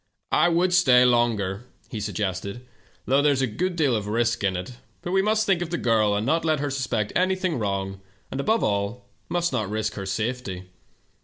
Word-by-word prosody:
H 175 Hz, -, +4 dB
would 180 Hz, +2 st, +2 dB
stay 130 Hz, -8 st, +6 dB
longer,' 120 Hz, -4 st, +1 dB, 0.2 s
he 110 Hz, -, -5 dB
suggested, 100 Hz, +2 st, -3 dB, 0.4 s
'though 135 Hz, +2 st, +3 dB
there 145 Hz, 0 st, +4 dB
is 135 Hz, -1 st, 0 dB
a -, -, +4 dB
good 175 Hz, -, -2 dB
deal 145 Hz, -7 st, +2 dB
of 105 Hz, -2 st, -3 dB
risk 115 Hz, +1 st, 0 dB
in 95 Hz, -2 st, +1 dB
it, 95 Hz, +7 st, -7 dB, 0.3 s
but 175 Hz, -, -4 dB
we 190 Hz, +1 st, +3 dB
must 215 Hz, +2 st, +1 dB
think 190 Hz, -4 st, +2 dB
of 175 Hz, -, -3 dB
the 175 Hz, -, -1 dB
girl, 110 Hz, -5 st, +2 dB
and 105 Hz, +2 st, -1 dB
not 160 Hz, +5 st, +1 dB
let 155 Hz, -2 st, +1 dB
her 145 Hz, 0 st, -2 dB
suspect 125 Hz, -6 st, -2 dB
anything 185 Hz, -4 st, +1 dB
wrong, 95 Hz, -2 st, -3 dB, 0.3 s
and, 135 Hz, -, -4 dB
above 220 Hz, +11 st, +1 dB
all, 100 Hz, +4 st, -1 dB, 0.2 s
must 175 Hz, -3 st, 0 dB
not 110 Hz, -6 st, -1 dB
risk 110 Hz, 0 st, -2 dB
her 100 Hz, -2 st, -6 dB
safety. 95 Hz, -3 st, -3 dB
120 Hz, 205 wpm, -25 LUFS, 105-160 Hz, 0.4 s, stay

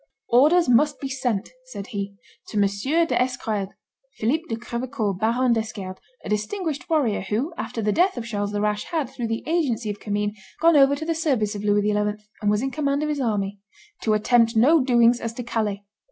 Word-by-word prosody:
"Orders 305 Hz, +8 st, +5 dB
must 285 Hz, +5 st, +3 dB
be 275 Hz, -, -4 dB
sent," 245 Hz, -6 st, -2 dB, 0.2 s
said 350 Hz, -, -7 dB
he, 200 Hz, -3 st, -5 dB, 0.3 s
"to 215 Hz, -, -5 dB
M. 205 Hz, -, +5 dB, 0.4 s
d'Esquerdes 245 Hz, -9 st, -1 dB, 0.5 s
[Philip 260 Hz, +9 st, +1 dB
de 225 Hz, -, -1 dB
Crevecoeur, 235 Hz, -2 st, -3 dB
Baron 235 Hz, +6 st, +2 dB
d'Esquerdes, 210 Hz, -4 st, -4 dB, 0.3 s
a -, -, -5 dB
distinguished 295 Hz, -, -2 dB
warrior, 285 Hz, -10 st, +1 dB
who, 220 Hz, -, -2 dB
after 230 Hz, -8 st, -4 dB
the 210 Hz, -, +2 dB
death 360 Hz, -, +2 dB
of 235 Hz, -, -4 dB
Charles 205 Hz, -3 st, -2 dB
the 205 Hz, 0 st, -2 dB
Rash, 210 Hz, 0 st, 0 dB
had, 310 Hz, -7 st, -2 dB
through 240 Hz, -3 st, -4 dB
the 225 Hz, 0 st, -3 dB
agency 275 Hz, -10 st, 0 dB
of 205 Hz, -, -8 dB
Commynes, 205 Hz, 0 st, -2 dB, 0.2 s
gone 335 Hz, 0 st, +5 dB
over 280 Hz, 0 st, +6 dB
to 315 Hz, +2 st, -5 dB
the 330 Hz, -, 0 dB
service 265 Hz, -10 st, 0 dB
of 205 Hz, -1 st, -6 dB
Louis 205 Hz, 0 st, +2 dB
XI., 210 Hz, -, +2 dB, 0.5 s
and 210 Hz, -, +1 dB
was 210 Hz, +3 st, +1 dB
in 270 Hz, -, -1 dB
command 285 Hz, -1 st, 0 dB
of 305 Hz, -, -1 dB
his 295 Hz, -2 st, -1 dB
army] 205 Hz, -4 st, -1 dB, 0.4 s
to 215 Hz, -1 st, +2 dB
attempt 230 Hz, +1 st, +3 dB
no 275 Hz, +7 st, +5 dB
doings 240 Hz, -2 st, +4 dB
as 230 Hz, 0 st, -3 dB
to 245 Hz, -, -6 dB
Calais. 215 Hz, -4 st, -2 dB
235 Hz, 195 wpm, -24 LUFS, 210-280 Hz, 0.5 s, over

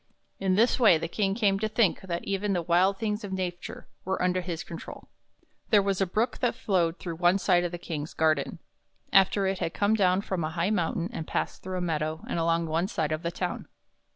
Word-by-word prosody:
In 190 Hz, -1 st, +1 dB
this 230 Hz, +6 st, +3 dB
way 215 Hz, -9 st, +6 dB
the 165 Hz, -, -3 dB
King 195 Hz, +2 st, 0 dB
came 200 Hz, -4 st, +2 dB
to 215 Hz, +1 st, -1 dB
think 215 Hz, -4 st, +2 dB
that 175 Hz, -3 st, -4 dB
even 200 Hz, +1 st, -1 dB
the 175 Hz, -2 st, 0 dB
wild 180 Hz, +4 st, +3 dB
things 210 Hz, 0 st, -2 dB
of 200 Hz, -, -6 dB
nature 180 Hz, -2 st, -5 dB, 0.2 s
were 190 Hz, +1 st, -2 dB
under 180 Hz, 0 st, +1 dB
his 170 Hz, -2 st, -4 dB
control. 165 Hz, -, -9 dB, 0.6 s
There 210 Hz, -, +6 dB
was 195 Hz, -1 st, 0 dB
a 195 Hz, -, +2 dB
Brook 220 Hz, +7 st, -1 dB
that 245 Hz, -2 st, +1 dB
flowed 175 Hz, -4 st, 0 dB
through 170 Hz, -3 st, -6 dB
one 175 Hz, +2 st, +4 dB
side 180 Hz, -3 st, +3 dB
of 175 Hz, -, -2 dB
the 175 Hz, -, -4 dB
King's 160 Hz, -3 st, -6 dB
garden, 155 Hz, -3 st, +1 dB, 0.6 s
after 195 Hz, +1 st, +4 dB
it 190 Hz, -1 st, -1 dB
had 165 Hz, -, -3 dB
come 205 Hz, +1 st, +2 dB
down 190 Hz, -3 st, +3 dB
from 190 Hz, -4 st, -3 dB
a 155 Hz, -, -1 dB
high 170 Hz, +4 st, -1 dB
mountain 175 Hz, -3 st, -1 dB
and 160 Hz, -, -5 dB
passed -, -, -2 dB
through 185 Hz, 0 st, -4 dB
a -, -, -2 dB
meadow 155 Hz, -1 st, -2 dB
and -, -, -2 dB
along 165 Hz, 0 st, +1 dB
one 165 Hz, +3 st, 0 dB
side 160 Hz, -7 st, -2 dB
of 155 Hz, 0 st, -1 dB
the 170 Hz, -, -2 dB
town. -, -, -4 dB
180 Hz, 225 wpm, -27 LUFS, 165-195 Hz, 0.6 s, way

